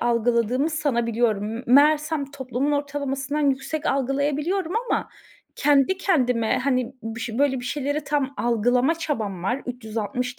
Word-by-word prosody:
algıladığımı 240 +4 +1
sanabiliyorum. 235 -8 0
M 240 - -6
meğersem 295 +2 +3
toplumun 265 +1 -2
ortalamasından 285 0 -1
yüksek 270 +3 -3
algılayabiliyorum 290 +7 0 0.2
ama - - 0 0.5
kendi 290 +5 +3
kendime, 250 - +1
hani, 255 -1 0
bış 225 +1 -5
böyle 265 +2 +1
bir - - -8
şeyleri 285 +3 -2
tam 280 -1 -1
algılama 245 +6 +2
çabam 220 - -3
var 245 +8 -1
360 245 +1 -4
265 Hz, 120 wpm, -24 LUFS, 240-290 Hz, 0.5 s, meğersem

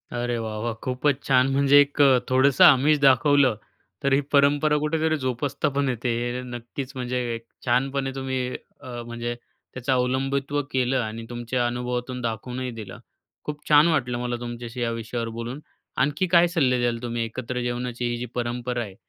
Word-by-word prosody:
अरे 120 0 -1
वाह 110 -1 -4
वाह! 120 -1 -1
खूपच 130 +2 0
छान! 130 -1 +4
म्हणजे 140 +1 +5
एक 145 +1 0
अ, 135 -3 +6
थोडंसं 130 +1 +4
आमिष 150 +2 +6
दाखवलं, 135 -1 +5 0.5
तर 140 0 +2
ही 135 - +5
परंपरा 145 +1 +4
कुठेतरी 155 +1 0
जोपासता 130 +3 -1
पण 140 -1 +1
येते. 125 0 -2 0.3
हे - - -4
नक्कीच 125 +2 -7
म्हणजे 125 -1 -3 0.2
एक 115 0 -7 0.2
छानपणे 135 +2 0
तुम्ही, 130 -1 -2 0.4
अ, 125 -3 -7
म्हणजे 120 0 -4 0.4
त्याचं 125 +1 -3
अवलंबित्व 135 +3 0
केलं 130 0 +1
आणि 115 -1 -4
तुमच्या 120 +1 -2
अनुभवातून 125 +1 -3
दाखवूनही 125 +2 -4
दिलं. 100 -3 -8 0.4
खूप 150 0 -7
छान 150 +2 +7
वाटलं 130 -7 0
मला 120 0 -2
तुमच्याशी 120 0 -6
या 115 -1 0
विषयावर 115 0 -4
बोलून. 120 +4 -5 0.4
आणखी 150 +6 +1
काय 175 0 +5
सल्ले 135 -8 +1
द्याल 120 -1 0
तुम्ही, 120 -1 -2
एकत्र 125 +2 -4
जेवणाची 120 0 -3
ही 120 - -2
जी 120 - -4
परंपरा 120 0 -2
आहे, 100 -4 -10
125 Hz, 165 wpm, -24 LUFS, 120-140 Hz, 0.5 s, छान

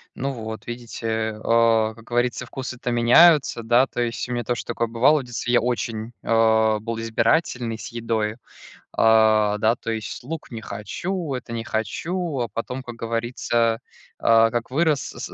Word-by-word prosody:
Ну 140 +2 -2
вот 110 -3 -7
видите, 110 -2 -4
а, 115 -1 +3
как 115 0 -16
говорится, 120 0 -1
вкусы-то 130 -1 -5
меняются, 125 +3 +5
да, 120 +3 +4
то 120 - -4
есть 120 +1 -2
у - - -7
меня 120 -1 -2
тоже 120 +1 -3
такое 115 - -2
бывало: 130 +7 +3
в - - -6
детстве 120 0 -3
я 120 - +5
очень, 115 -1 -2
э, 110 -1 +3
был 115 +1 -4
избирательный 115 0 0
с 110 - -8
едой, 115 -1 -2 0.6
а, 110 -2 +4
да, 110 +2 +2
то 115 - -5
есть 110 +1 -5
лук 160 0 -7
не 115 -1 -6
хочу, 160 - -4
это 125 -2 -6
не 115 -1 -4
хочу, 155 - -2
а 120 - -1
потом, 125 +3 -5
как 120 -2 -9
говорится, 115 0 -1 0.4
а, 115 0 +5
как 120 +1 -3
вырос, 150 -1 +2
с - - -8
115 Hz, 170 wpm, -23 LUFS, 110-125 Hz, 0.6 s, меняются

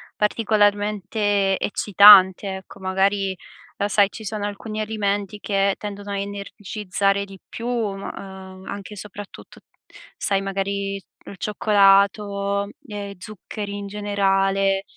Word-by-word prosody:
particolarmente 205 -2 +1
eccitante, 200 -1 +6
ecco, 190 +1 -13
magari, 190 +1 0 0.4
uhm 200 - 0
sai 200 -1 +4
ci 220 - -10
sono 210 0 -3
alcuni 215 +1 -5
alimenti, 205 -1 -2
che 195 -1 +1
tendono 205 -1 -7
a 200 - -2
energizzare 200 0 -2
di 195 -1 -12
più, 235 - -6
mhmm, 220 -5 -2
uhm, 190 -1 -9
anche 200 +1 -7
soprattut 205 0 -10 0.6
sai, 195 -1 0
magari, 195 0 -2 0.3
il 195 - -10
cioccolato 200 -1 +2 0.2
e 205 -2 -6
zuccheri 205 +1 -7
in 200 0 -6
generale. 195 -1 +1
200 Hz, 110 wpm, -22 LUFS, 195-205 Hz, 0.6 s, eccitante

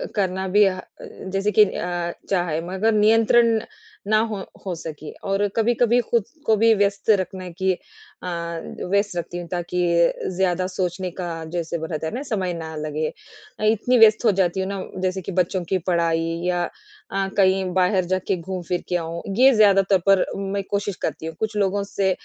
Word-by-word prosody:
करना 190 -2 -1
भी 205 +3 +5
अ, 185 -1 0 0.2
जैसे 195 +2 -3
कि 210 +2 +7
अ, 175 -2 -3 0.2
चाहे, 175 -5 0
मगर 190 +5 +1
नियंत्रण 225 +2 +4 0.5
ना 215 +1 +4
हो 220 -2 -4 0.3
हो 185 - -2
सके। 155 -2 -8 0.2
और 195 +1 +2
कभी-कभी 240 +1 +3
खुद 235 -1 0 0.2
को 220 - +4
भी 225 +1 +5
व्यस्त 200 0 0
रखने 185 -1 -5
की 190 +2 +1
अ, 435 - -14 0.6
व्यस्त 200 -1 +1
रखती 175 +1 -4
हूँ 175 -1 -6
ताकि 175 +1 -3 0.6
ज़्यादा 185 -1 +1
सोचने 185 0 -2
का 170 -2 -4
जैसे 170 0 -2
रहता 160 0 -3
है - - -5
ना, 250 - -3
समय 195 -9 -2
ना 160 -1 -6
लगे। 155 0 -2 0.6
इतनी 235 +3 +2
व्यस्त 220 0 +6
हो 220 - +6
जाती 180 0 +1
हूँ 190 - -1
ना, 200 -1 -3 0.2
जैसे 185 0 -1
कि 185 - -6
बच्चों 180 0 0
की 190 - +2
पढ़ाई 165 -1 +1 0.2
या 175 -1 +1 0.5
अ, 195 0 0
कहीं 190 -1 +4
बाहर 185 0 +2
जाके 185 +2 0
घूम-फिर 180 0 -4
के 180 - 0
आऊँ। 170 0 -3 0.2
ये 265 +2 +7
ज़्यादा 200 -2 +6
तौर 190 - +5
पर 195 -1 +5
मैं 195 0 -2
कोशिश 200 -1 -1
करती - - -3
हूँ। 160 0 -5
कुछ 220 -1 -2
लोगों 200 0 +1
से 195 -1 0
190 Hz, 180 wpm, -23 LUFS, 175-205 Hz, 0.6 s, कि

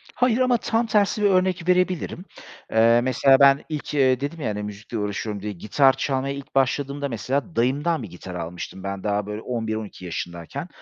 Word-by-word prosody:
Hayır 250 -2 +2
ama 255 -1 +3
tam 230 +1 0
tersi 210 -1 +2
bir - - +5
örnek 185 -1 +1
verebilirim. 180 0 +1 0.5
Eee, 115 +1 +5
mesela 130 +2 +4
ben 140 0 +6
ilk, 150 -1 -5
eee, 130 -2 +3
dedim 150 +4 -4
ya, 125 - -2
hani, 105 0 -3
müzikle 105 +2 -6
uğraşıyorum 105 0 -3
diye, 105 - -3
gitar 130 +9 +3
çalmaya 135 0 -1
ilk 140 -1 -10
başladığımda, 140 +1 0
mesela, 135 - -3
dayımdan 140 +6 +1
bir 105 - -7
gitar 90 +1 -9
almıştım, 90 +2 -6
ben 100 -1 -5
daha, 105 -1 0
böyle, 105 +1 -5
11-12 110 -5 -4
yaşındayken. 85 -1 -5
130 Hz, 175 wpm, -23 LUFS, 105-155 Hz, 0.5 s, ben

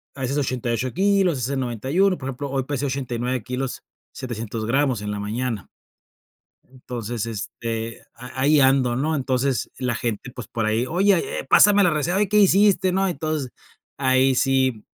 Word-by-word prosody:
a 135 - -8
veces 130 +3 -1
88 125 -2 -1
kilos, 195 -1 +3
a - - -4
veces 135 +3 -1
91, 135 - +1
por 135 - -6
ejemplo, 135 +2 -5
hoy 135 -1 -1
pesé 145 +1 -3
89 125 -3 -2
kilos 125 +1 -4 0.3
700 115 -3 -5
gramos 130 -1 +1
en 105 0 -4
la 105 - -4
mañana 110 0 -3 1.2
entonces, 115 -2 -3
este, 115 +1 -5
a 125 +2 -8
ahí 145 +2 +4
ando, 130 -2 +3
¿no?, 155 +5 0
entonces, 130 -2 -1
la 125 -2 -1
gente, 115 +1 -3
pues, 125 -6 -8
por 115 -2 -2
ahí: 110 +3 +1
"Oye, 200 - +1
eh, - - -9
pásame 205 -1 +6
la 180 - +4
receta, 160 +3 0
¿oye 205 0 +2
qué 210 - +4
hiciste?", 195 -2 +4
¿no?, 190 +1 +1
entonces, 155 -6 -3 0.5
ahí 130 0 +3
sí, 130 -3 +1
130 Hz, 170 wpm, -23 LUFS, 120-155 Hz, 1.2 s, pásame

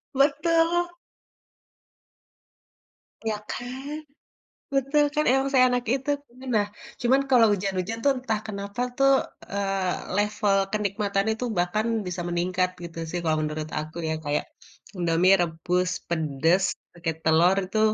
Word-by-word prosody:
Betul. 330 +5 +2 2.3
Ya 220 -1 -1
kan? 265 +4 -5 0.8
Betul, 275 +2 +3
kan 300 0 +2
emang 270 +1 +2
seenak 250 -1 +4
itu. 270 +2 -2 0.4
Nah, 210 -1 +3 0.4
cuman 260 +3 +4
kalau 245 -4 +6
hujan-hujan 195 +2 -2
tuh 280 - +5
entah 225 -4 -1
kenapa 200 +2 -5 0.2
tuh, 275 0 +5 0.4
eee, 195 -2 -1
level 210 -1 +2 0.2
kenikmatan 200 -1 0
itu 220 +3 -3
bahkan 180 +5 +1 0.2
bisa 180 0 -3
meningkat 180 +1 0
gitu 165 -1 -8
sih 175 - -2
kalau 155 -1 +1
menurut 155 0 -4
aku 155 +2 -7
ya, - - +1
kayak, 145 0 0 0.5
Indomie 175 +2 +4
rebus 175 +2 0 0.2
pedes 160 +3 +2 0.3
pake 170 -1 -2
telur 165 +4 +5
itu, 195 +4 -2
200 Hz, 120 wpm, -26 LUFS, 175-255 Hz, 2.3 s, kalau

